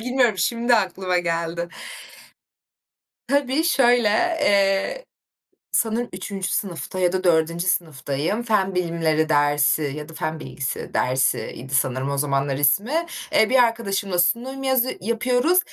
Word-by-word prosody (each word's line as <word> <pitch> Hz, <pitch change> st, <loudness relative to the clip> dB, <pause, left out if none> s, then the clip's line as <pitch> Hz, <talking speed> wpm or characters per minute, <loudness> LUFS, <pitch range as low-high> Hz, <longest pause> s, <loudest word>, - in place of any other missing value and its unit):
Bilmiyorum, 245 Hz, -4 st, +1 dB
şimdi 235 Hz, +5 st, +2 dB
aklıma 185 Hz, -3 st, 0 dB
geldi. 170 Hz, 0 st, -2 dB, 1.6 s
Tabii 280 Hz, +2 st, +1 dB
şöyle: 245 Hz, -9 st, +3 dB, 0.3 s
Eee, 200 Hz, -, +1 dB, 0.7 s
sanırım 230 Hz, +1 st, 0 dB
3. 190 Hz, 0 st, -5 dB
sınıfta 185 Hz, -1 st, -3 dB
ya 180 Hz, -1 st, +2 dB
da 185 Hz, 0 st, -2 dB
4. 165 Hz, +1 st, +1 dB
sınıftayım. 160 Hz, -, -1 dB
Fen 200 Hz, -5 st, 0 dB
bilimleri 165 Hz, -3 st, 0 dB
dersi 145 Hz, 0 st, +2 dB
ya 150 Hz, +1 st, -7 dB
da 165 Hz, -, -12 dB
fen 155 Hz, 0 st, -4 dB
bilgisi 140 Hz, 0 st, -5 dB
dersi 130 Hz, +1 st, 0 dB
idi 130 Hz, +3 st, -8 dB
sanırım 130 Hz, 0 st, 0 dB
o 140 Hz, -, -2 dB
zamanlar 140 Hz, -1 st, 0 dB
ismi. 220 Hz, -, +1 dB, 0.3 s
Eee, 220 Hz, -, +3 dB
bir 255 Hz, -1 st, +6 dB
arkadaşımla 200 Hz, -5 st, -1 dB
sunum 245 Hz, +9 st, 0 dB
yazı 260 Hz, -1 st, +1 dB
yapıyoruz. 245 Hz, -, +1 dB
185 Hz, 125 wpm, -22 LUFS, 160-235 Hz, 1.6 s, bir